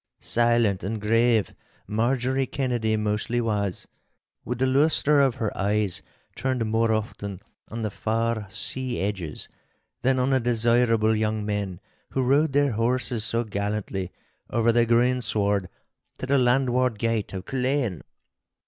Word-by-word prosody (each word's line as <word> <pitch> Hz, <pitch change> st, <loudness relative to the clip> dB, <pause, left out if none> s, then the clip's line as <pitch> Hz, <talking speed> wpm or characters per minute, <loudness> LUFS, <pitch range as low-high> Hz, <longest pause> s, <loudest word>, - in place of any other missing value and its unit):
Silent 120 Hz, -4 st, +1 dB
and 105 Hz, +4 st, -3 dB
grave 115 Hz, +1 st, +2 dB, 0.3 s
Marjorie 125 Hz, +5 st, 0 dB
Kennedy 120 Hz, -5 st, -1 dB
mostly 105 Hz, +3 st, -1 dB
was, 105 Hz, -5 st, -2 dB, 0.6 s
with 125 Hz, -, -3 dB
the 130 Hz, -, +1 dB
lustre 145 Hz, +2 st, +3 dB
of 135 Hz, -3 st, +2 dB
her 110 Hz, -5 st, -3 dB
eyes 100 Hz, -1 st, 0 dB, 0.3 s
turned 130 Hz, -3 st, -1 dB
more 110 Hz, +1 st, +1 dB
often 100 Hz, -3 st, -3 dB, 0.3 s
on 115 Hz, +1 st, -5 dB
the 110 Hz, -, -2 dB
far 115 Hz, 0 st, -1 dB
sea 130 Hz, +5 st, 0 dB
edges, 95 Hz, -6 st, -4 dB, 0.5 s
than 130 Hz, +1 st, +2 dB
on 130 Hz, +1 st, +1 dB
the 135 Hz, -, +3 dB
desirable 115 Hz, -2 st, +2 dB
young 110 Hz, -1 st, -1 dB
men 100 Hz, -4 st, -3 dB, 0.3 s
who 135 Hz, -, +1 dB
rode 140 Hz, +3 st, +2 dB
their 145 Hz, -1 st, +3 dB
horses 120 Hz, 0 st, 0 dB
so 115 Hz, +1 st, +1 dB
gallantly 100 Hz, -3 st, -3 dB, 0.4 s
over 115 Hz, 0 st, +2 dB
the 120 Hz, 0 st, +3 dB
greensward 110 Hz, -5 st, +1 dB, 0.5 s
to -, -, -5 dB
the 140 Hz, +1 st, +2 dB
landward 125 Hz, -1 st, +2 dB
gate 115 Hz, -1 st, -1 dB
of 95 Hz, -1 st, -6 dB
Culzean. 130 Hz, -, -1 dB
115 Hz, 135 wpm, -25 LUFS, 105-125 Hz, 0.6 s, lustre